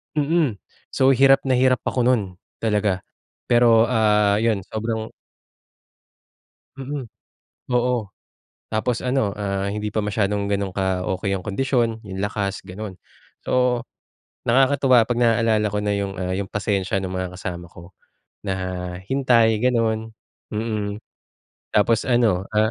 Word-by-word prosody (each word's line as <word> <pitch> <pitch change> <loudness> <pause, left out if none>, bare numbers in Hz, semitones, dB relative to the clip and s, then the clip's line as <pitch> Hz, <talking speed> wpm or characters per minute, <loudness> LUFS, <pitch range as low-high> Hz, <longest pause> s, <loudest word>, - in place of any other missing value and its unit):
Mm, 150 -4 +1 0.4
so, 130 0 +5
hirap 135 +1 +5
na 130 -2 +2
hirap 130 0 +3
ako 125 -2 0
no'n, 100 -8 0 0.2
talaga. 105 -3 +1 0.5
Pero, 120 -2 +6
ah, 105 -3 +3
'yon 110 -4 +1
sobrang 110 +2 -4 1.7
Mm, 135 -1 -5 0.7
oo, 120 -4 0 0.6
tapos 115 +3 -1
ano, 125 -6 0
ah, 100 -1 -2
hindi 105 +1 -3
pa 110 - 0
masyadong 105 -1 -1
gano'n 100 -1 -1
ka-okey 95 +1 -1
yung 95 - -8
kondisyon, 115 +1 0
yung 100 -4 -8
lakas, 100 -1 -3
gano'n. 95 +1 -7 0.5
So, 125 -2 +1 0.6
nakakatuwa 130 -1 +4
'pag 120 - 0
naalala 115 -2 +3
ko 105 - 0
na 105 - -1
yung, 100 -1 -3
ah, 90 0 -2
yung 100 - -2
pasensya 100 -2 -1
ng 95 - -4
mga 95 -1 -4
kasama 90 -1 -6
ko 85 0 -14 0.6
na, 95 - 0 0.5
hintay 120 -3 +3
gano'n, 115 -3 0 0.4
mm, 105 -1 -3 0.7
tapos 110 +2 +3
ano, 115 -7 +2
ah 110 +1 +3
110 Hz, 125 wpm, -22 LUFS, 100-120 Hz, 1.7 s, Pero